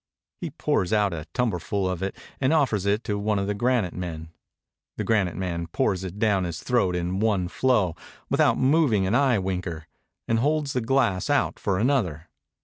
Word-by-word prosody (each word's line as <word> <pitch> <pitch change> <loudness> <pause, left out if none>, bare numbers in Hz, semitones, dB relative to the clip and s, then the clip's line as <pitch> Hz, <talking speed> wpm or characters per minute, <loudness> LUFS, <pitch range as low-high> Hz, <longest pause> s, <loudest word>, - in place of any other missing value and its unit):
He - - -4
pours 90 - -1
out 105 -3 +2
a 80 -1 -6
tumblerful 100 -4 -1
of 90 -1 -3
it, 95 0 -3 0.2
and 130 +1 +2
offers 115 - +2
it 105 +3 +1
to 105 -1 -2
one 105 0 0
of 100 - 0
the 105 - -1
gram'te 115 -4 +1
men. 80 -3 -6 0.7
The - - -1
granite 100 -6 +1
man 85 -3 -3
pours 95 +3 0
it 95 +1 -6
down 105 -3 +2
his 85 -3 -5
throat 115 -8 +1
in 90 +2 -2
one 100 -4 +1
flow, 100 -5 +1 0.3
without - - +3
moving 130 -8 +3
an 95 - 0
eye 130 -1 +3
winker, 90 -4 -3 0.4
and 115 0 +2
holds 150 +2 0
the 125 - 0
glass 115 -4 +1
out 145 -1 +1
for 100 -3 0
another. 95 - 0
100 Hz, 185 wpm, -25 LUFS, 90-120 Hz, 0.7 s, without